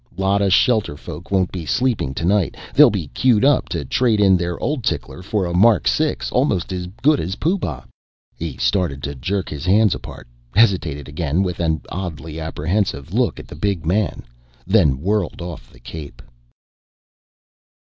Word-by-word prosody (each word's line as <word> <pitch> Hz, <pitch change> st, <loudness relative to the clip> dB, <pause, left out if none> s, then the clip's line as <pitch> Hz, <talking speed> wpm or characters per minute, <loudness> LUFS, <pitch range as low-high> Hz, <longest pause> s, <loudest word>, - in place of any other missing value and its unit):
Lot 95 Hz, +1 st, +1 dB
of 100 Hz, -1 st, +2 dB
shelterfolk 100 Hz, -, 0 dB
won't 95 Hz, -2 st, +1 dB
be 90 Hz, -3 st, -5 dB
sleeping 115 Hz, -, 0 dB
tonight. 90 Hz, +3 st, +1 dB, 0.2 s
They'll -, -, +8 dB
be 90 Hz, -8 st, -3 dB
queued 120 Hz, -, +3 dB
up 145 Hz, -2 st, +3 dB
to 80 Hz, -5 st, -3 dB
trade 115 Hz, -, +2 dB
in 95 Hz, -2 st, +5 dB
their 85 Hz, -1 st, -2 dB
old 145 Hz, -5 st, -2 dB
tickler 90 Hz, -, -3 dB
for 100 Hz, 0 st, -1 dB
a 85 Hz, -, -3 dB
Mark 95 Hz, -, +4 dB
6 -, -, 0 dB
almost 90 Hz, +1 st, 0 dB
as 90 Hz, -1 st, -4 dB, 0.2 s
good 150 Hz, +1 st, +4 dB
as 90 Hz, +4 st, -3 dB
Pooh 180 Hz, -, 0 dB
Bah." 75 Hz, -, -4 dB, 0.5 s
He 80 Hz, -6 st, -5 dB
started 85 Hz, -9 st, 0 dB
to 70 Hz, -, -3 dB
jerk 90 Hz, +9 st, -2 dB
his 75 Hz, -1 st, -6 dB
hands 105 Hz, +1 st, +4 dB
apart, -, -, -9 dB, 0.3 s
hesitated 90 Hz, -10 st, +2 dB
again 80 Hz, +3 st, -1 dB
with 90 Hz, -2 st, -3 dB
an 80 Hz, -2 st, 0 dB
oddly 80 Hz, -3 st, -5 dB
apprehensive 80 Hz, -1 st, -2 dB
look -, -, +1 dB
at -, -, -10 dB
the -, -, -11 dB
big 85 Hz, +1 st, -2 dB
man, 95 Hz, +4 st, 0 dB, 0.4 s
then 85 Hz, -10 st, +3 dB
whirled 100 Hz, +1 st, -1 dB
off 85 Hz, -2 st, -8 dB
the -, -, -18 dB
cape. 75 Hz, +3 st, -9 dB
90 Hz, 165 wpm, -20 LUFS, 80-105 Hz, 0.5 s, They'll